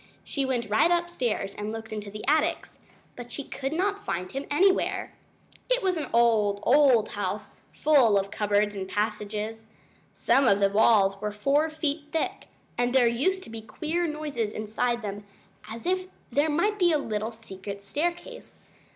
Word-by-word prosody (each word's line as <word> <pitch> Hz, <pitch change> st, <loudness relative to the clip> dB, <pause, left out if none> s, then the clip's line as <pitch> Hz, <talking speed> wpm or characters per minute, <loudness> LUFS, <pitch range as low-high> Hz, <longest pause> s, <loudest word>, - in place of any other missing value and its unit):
She 275 Hz, -2 st, -2 dB
went 245 Hz, -3 st, -1 dB
right 220 Hz, +10 st, +3 dB
upstairs 340 Hz, -, -1 dB
and 210 Hz, +1 st, -5 dB
looked 220 Hz, 0 st, -7 dB
into 210 Hz, -1 st, -5 dB
the 210 Hz, +2 st, -8 dB
attics, 315 Hz, +3 st, 0 dB, 0.4 s
but 245 Hz, -1 st, -9 dB
she 285 Hz, -, -5 dB
could 270 Hz, 0 st, -5 dB
not 400 Hz, +5 st, -1 dB
find 180 Hz, +1 st, -3 dB
him 275 Hz, +1 st, -5 dB
anywhere. 375 Hz, +6 st, +2 dB, 0.6 s
It -, -, +2 dB
was 375 Hz, -1 st, +2 dB
an 310 Hz, -3 st, -3 dB
old, 220 Hz, -4 st, +3 dB
old 260 Hz, -4 st, +5 dB
house, -, -, -4 dB, 0.2 s
full 265 Hz, -9 st, +4 dB
of 195 Hz, 0 st, -1 dB
cupboards 205 Hz, 0 st, +1 dB
and 190 Hz, -1 st, -5 dB
passages. 210 Hz, +1 st, -3 dB, 0.4 s
Some 270 Hz, -1 st, +2 dB
of 200 Hz, -2 st, +4 dB
the 200 Hz, -1 st, +3 dB
walls 200 Hz, -2 st, +4 dB
were 210 Hz, 0 st, -2 dB
four 280 Hz, +9 st, +1 dB
feet 305 Hz, -1 st, -2 dB
thick, 325 Hz, -, -2 dB, 0.3 s
and 245 Hz, +1 st, +1 dB
there 255 Hz, -2 st, +6 dB
used 295 Hz, +12 st, +1 dB
to -, -, -11 dB
be 225 Hz, -1 st, -6 dB
queer 325 Hz, +9 st, -2 dB
noises 290 Hz, -8 st, -3 dB
inside 230 Hz, +2 st, -2 dB
them, 205 Hz, 0 st, -5 dB, 0.5 s
as 225 Hz, +1 st, -8 dB
if 370 Hz, +1 st, 0 dB, 0.2 s
there 290 Hz, +3 st, +2 dB
might 410 Hz, +8 st, +1 dB
be 350 Hz, -2 st, +4 dB
a 310 Hz, -, +3 dB
little 220 Hz, -5 st, -3 dB
secret 200 Hz, -3 st, -9 dB
staircase. 345 Hz, -, -4 dB
235 Hz, 170 wpm, -27 LUFS, 210-310 Hz, 0.6 s, there